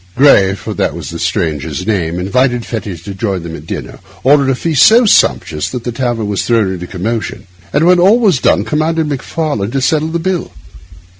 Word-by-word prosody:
Gray, 100 Hz, -8 st, +5 dB
for -, -, -6 dB
that -, -, -1 dB
was -, -, -7 dB
the -, -, -6 dB
stranger's 80 Hz, +2 st, -2 dB
name, 85 Hz, -6 st, -1 dB
invited 120 Hz, +6 st, 0 dB
Fettes 100 Hz, -7 st, -6 dB
to 100 Hz, -, -7 dB
join 95 Hz, -3 st, -3 dB
them 85 Hz, -1 st, -7 dB
at 75 Hz, +1 st, -11 dB
dinner, -, -, -6 dB, 0.2 s
ordered 140 Hz, 0 st, +4 dB
a 135 Hz, -, +2 dB
feast 155 Hz, +1 st, 0 dB
so 235 Hz, +2 st, +6 dB
sumptuous 80 Hz, -, +2 dB
that 125 Hz, -2 st, -5 dB
the 120 Hz, -, -3 dB
tavern 120 Hz, -3 st, -2 dB
was 100 Hz, -1 st, -1 dB
thrown 110 Hz, -5 st, +1 dB
into 90 Hz, -1 st, -7 dB
commotion, 105 Hz, +5 st, -4 dB, 0.3 s
and 160 Hz, -, +2 dB
when 180 Hz, 0 st, +5 dB
all 195 Hz, +6 st, +5 dB
was 195 Hz, -, +2 dB
done 105 Hz, -, +2 dB
commanded 155 Hz, +5 st, 0 dB
Macfarlane 145 Hz, -6 st, -3 dB
to 135 Hz, +3 st, -1 dB
settle 155 Hz, +4 st, +1 dB
the 165 Hz, +1 st, -2 dB
bill. 180 Hz, +1 st, -3 dB
120 Hz, 200 wpm, -14 LUFS, 95-155 Hz, 0.3 s, so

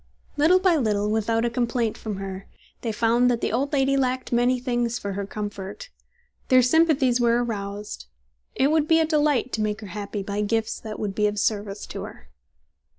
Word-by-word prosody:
Little 315 Hz, +5 st, +5 dB
by 370 Hz, -3 st, +3 dB
little, 210 Hz, -5 st, 0 dB
without 225 Hz, +1 st, +1 dB
a -, -, +1 dB
complaint 235 Hz, -2 st, 0 dB
from 215 Hz, -3 st, -5 dB
her, 195 Hz, 0 st, -6 dB, 0.3 s
they 230 Hz, -, -2 dB
found 235 Hz, +3 st, +3 dB
that 240 Hz, -2 st, +1 dB
the -, -, -1 dB
old 270 Hz, +5 st, 0 dB
lady 275 Hz, -1 st, +2 dB
lacked 255 Hz, -1 st, -1 dB
many 245 Hz, +1 st, +2 dB
things 240 Hz, -1 st, -1 dB
for 200 Hz, -1 st, -4 dB
her 200 Hz, 0 st, -4 dB
comfort. 205 Hz, -, -6 dB, 0.6 s
Their 255 Hz, -1 st, +5 dB
sympathies 270 Hz, -3 st, +3 dB
were 235 Hz, 0 st, +3 dB
aroused. 205 Hz, -2 st, -5 dB, 0.5 s
It 275 Hz, +3 st, +2 dB
would 310 Hz, -1 st, +2 dB
be 325 Hz, 0 st, +5 dB
a 320 Hz, -, +3 dB
delight 295 Hz, -5 st, +1 dB
to 220 Hz, -, -1 dB
make 210 Hz, 0 st, -1 dB
her -, -, -7 dB
happy 205 Hz, -1 st, -4 dB
by 200 Hz, +1 st, -3 dB
gifts 220 Hz, +1 st, -1 dB
that 215 Hz, -1 st, -7 dB
would 205 Hz, -2 st, -2 dB
be 210 Hz, +1 st, +2 dB
of 205 Hz, 0 st, -3 dB
service 205 Hz, -1 st, -1 dB
to -, -, -7 dB
her. -, -, -13 dB
230 Hz, 195 wpm, -24 LUFS, 210-260 Hz, 0.6 s, Little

